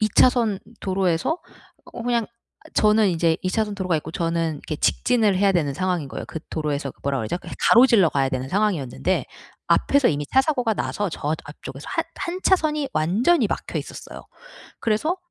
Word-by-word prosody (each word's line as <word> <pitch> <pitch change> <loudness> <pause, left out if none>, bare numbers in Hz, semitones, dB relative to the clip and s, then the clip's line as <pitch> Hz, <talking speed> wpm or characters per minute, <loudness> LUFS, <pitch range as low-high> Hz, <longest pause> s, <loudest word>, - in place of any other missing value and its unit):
2 215 - +2
차선 235 -6 +4 0.2
도로에서 190 - 0 0.5
어 - - -6
그냥 235 -2 0 0.5
저는 215 0 +4
이제 165 -1 +2
2 185 - -1
차선 210 0 -1
도로가 185 -4 0
있고 155 +1 -5
저는 165 -1 -1
이렇게 150 +1 -6
직진을 220 +2 +2
해야 200 0 +4
되는 155 -6 +1
상황인 180 -2 -1
거예요. - - -6
그 160 - -6
도로에서 145 -3 -2
뭐라 140 -1 0
그러죠 110 +8 -2
예 - - -7 0.2
가로질러 235 -7 +6
가야 135 -3 +1
되는 130 0 -3
상황이었는데 185 - 0 0.4
앞에서 280 -2 +3
이미 145 -1 -1
차 265 - +3
사고가 250 -7 0
나서 205 0 -2
저 155 -1 -2
앞쪽에서 145 -1 -10
1- 330 - -1
1 360 +2 -4
차선이 305 -6 +2
완전히 220 - +2
막혀 - - -3
있었어요. - - -8 0.6
그래서 230 - 0
190 Hz, 370 characters per minute, -23 LUFS, 155-235 Hz, 0.6 s, 가로질러